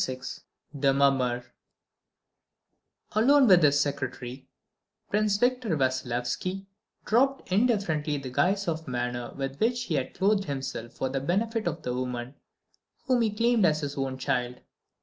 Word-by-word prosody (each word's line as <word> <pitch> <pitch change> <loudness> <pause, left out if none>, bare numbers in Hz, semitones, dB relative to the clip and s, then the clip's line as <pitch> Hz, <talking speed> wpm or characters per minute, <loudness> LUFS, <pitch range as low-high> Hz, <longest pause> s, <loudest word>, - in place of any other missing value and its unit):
VI 130 0 -3 0.5
THE 140 -1 +2
MUMMER 130 -3 +2 1.7
Alone 265 +6 +5
with 185 -4 +7
his 145 -2 +4
secretary, 130 -2 -3 0.6
Prince 210 -1 +2
Victor 245 -7 +1
Vassilyevski 130 +8 -2 0.4
dropped 270 -1 +1
indifferently 185 -9 +1
the 135 -2 -6
guise 195 +8 +1
of 160 -1 -2
manner 120 -1 -3
with 135 0 -4
which 240 +2 +1
he 175 - -3
had 135 -3 -2
clothed 195 +1 +2
himself 135 -4 -5
for 130 - -2
the 135 0 -2
benefit 215 - 0
of 165 -1 -3
the 125 - -2
woman 125 0 -4 0.7
whom 255 -3 +2
he 225 - +2
claimed 230 +1 +2
as 155 -3 +3
his 145 -1 -4
own 135 -1 -2
child. 125 -2 -2
145 Hz, 140 wpm, -27 LUFS, 130-205 Hz, 1.7 s, with